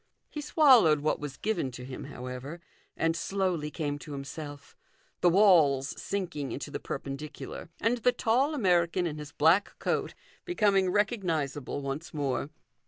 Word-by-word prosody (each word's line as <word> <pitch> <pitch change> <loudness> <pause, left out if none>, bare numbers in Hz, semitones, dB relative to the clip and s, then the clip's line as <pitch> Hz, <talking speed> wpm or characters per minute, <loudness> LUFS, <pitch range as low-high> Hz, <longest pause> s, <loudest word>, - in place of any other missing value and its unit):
He 300 - -5
swal 290 -5 +6
lowed 150 -2 +3
what 155 - 0
was 145 -2 -6
given 200 -11 -1
to 125 +1 -8
him, 130 0 -7
however, 130 +3 -7 0.4
and 165 0 +1
slowly 175 -3 -1
came 145 -2 -3
to 150 0 -9
himself 145 +1 -8 0.4
the 175 - +5
walls 165 -8 +5
sinking 180 -8 -3
into - - -5
the - - -4
perpendicular, 140 +4 -6
and 235 +2 +1
the 250 +2 +4
tall 260 +7 +1
American 180 - +2
in 155 -2 -3
his 150 -1 -8
black 165 +8 +3
coat - - -1 0.3
becoming 200 - +2
recognizable 165 - -1
once 140 +4 -5
i - - -5
more. 140 0 -1
165 Hz, 155 wpm, -29 LUFS, 145-200 Hz, 0.4 s, swal